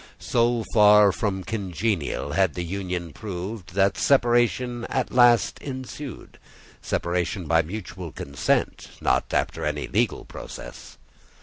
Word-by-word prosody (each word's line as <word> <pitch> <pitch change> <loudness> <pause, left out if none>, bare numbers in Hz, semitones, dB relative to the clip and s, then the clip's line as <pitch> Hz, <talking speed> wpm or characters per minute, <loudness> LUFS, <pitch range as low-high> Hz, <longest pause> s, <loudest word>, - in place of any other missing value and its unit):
So 120 -1 +1
far 105 -2 +7
from 95 -2 -2
congenial 95 -6 -2
had 95 0 +2
the 90 - -3
union 90 -2 -4
proved, 95 -2 -6
that 100 0 +2
separation 120 -2 +2
at 130 -2 -2
last 120 -2 +4
ensued—separation 105 - -5
by 80 +1 +3
mutual 90 +4 -7
consent, 70 0 -1
not - - +1
after - - -1
any - - -2
legal - - 0
process. - - -10
100 Hz, 110 wpm, -25 LUFS, 90-120 Hz, -, far